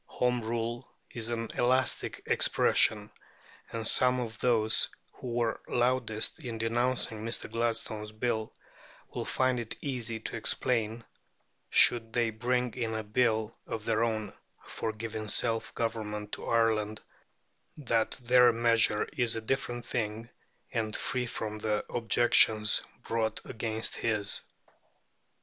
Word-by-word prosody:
Home 125 -1 +2
Rule 115 +1 -3 0.2
is 115 -1 -4
an 115 -1 -3
elastic 130 +2 +1
expression, - - +3 0.6
and 115 -1 -2
some 125 0 +3
of 110 -3 -5
those 110 -3 +2 0.2
who - - -9
were 115 -2 0
loudest 120 -3 +1
in 120 -3 -5
denouncing 115 -1 0
Mr. 115 +1 -3
Gladstone's 115 -2 -2
Bill 110 0 -2 0.6
will - - -3
find 130 -1 +1
it 115 -2 -4
easy 120 -5 -3
to - - -5
explain, 115 -1 0 0.6
should 115 -2 +4
they 120 -2 +1
bring 125 +2 0
in 115 -3 -2
a 110 - -2
Bill 110 0 +1
of 110 -1 -5
their 115 0 +2
own 110 -2 -2 0.3
for 110 - -3
giving 110 0 -5
self 115 +2 0
government 105 -2 -3
to - - -6
Ireland, 110 -2 +1 0.8
that 115 -6 0
their 125 0 +6
measure 115 -2 +3
is 120 -5 +1
a 115 - -3
different 120 0 -2
thing, 110 0 -3 0.4
and 110 -2 -1
free 125 -1 -2
from 110 -2 -4
the 105 -1 -1
objections 110 -2 +4 0.2
brought 110 -1 -1
against 110 0 -2
his. 105 -3 +1
115 Hz, 125 wpm, -30 LUFS, 110-120 Hz, 0.8 s, their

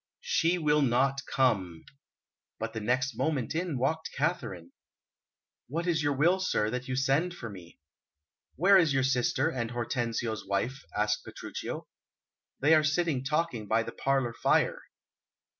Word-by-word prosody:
"She 180 - +2
will 150 -2 +2
not 135 +1 +2
come." 95 -11 0 0.7
But 115 0 -4
the 110 - -3
next 125 +3 0
moment 140 -2 -1
in 165 -3 -2
walked 160 +6 -1
Katharine. 135 - -2 1.0
"What 165 +6 -3
is 170 -3 +1
your 145 -1 +1
will, 175 +7 +3
sir, 110 - 0
that 125 +1 -4
you 130 - -2
send 140 +7 +1
for 115 -9 -7
me?" 90 -3 -12 0.8
"Where 195 +7 +6
is 160 -5 +3
your 135 - +3
sister, 130 +3 +1
and 115 -5 -3
Hortensio's 115 -3 -2
wife?" 100 +7 -2
asked 105 0 +1
Petruchio. - - -6 0.7
"They 150 +4 +5
are 155 -1 +5
sitting 155 -3 +1
talking 145 -6 -1
by 110 +2 +2
the - - -6
parlour 135 -3 0
fire." - - +1
135 Hz, 145 wpm, -29 LUFS, 115-160 Hz, 1.0 s, Where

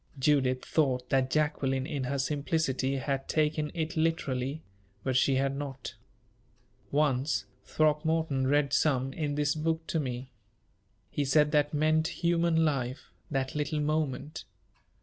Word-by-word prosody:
_" - - -11
Judith 130 -2 +2
thought 130 -5 +1
that 130 -1 +2
Jacqueline, 135 -3 0
in 145 -4 -3
her 140 +2 -1
simplicity, 140 -1 0
had 135 0 -2
taken 150 -1 +1
it 160 0 -2
literally; 155 -3 -1 0.4
but 130 -1 -1
she 130 +1 +3
had 135 +1 +1
not. 135 -3 -6 1.0
"Once, 135 -2 +1 0.2
Throckmorton 155 -2 +1
read 145 0 +2
some 135 -3 +2
in 145 -2 -2
this 145 0 +1
book 160 +1 -1
to 160 - -1
me. 130 -2 -4 0.8
He 145 - 0
said 150 +2 +3
that 145 -1 +2
meant 155 +1 +2 0.2
human 170 -1 +3
life 130 -3 -2 0.2
that 135 -2 -1
little 150 +1 -1
moment. 150 0 -2
145 Hz, 135 wpm, -29 LUFS, 135-155 Hz, 1.0 s, she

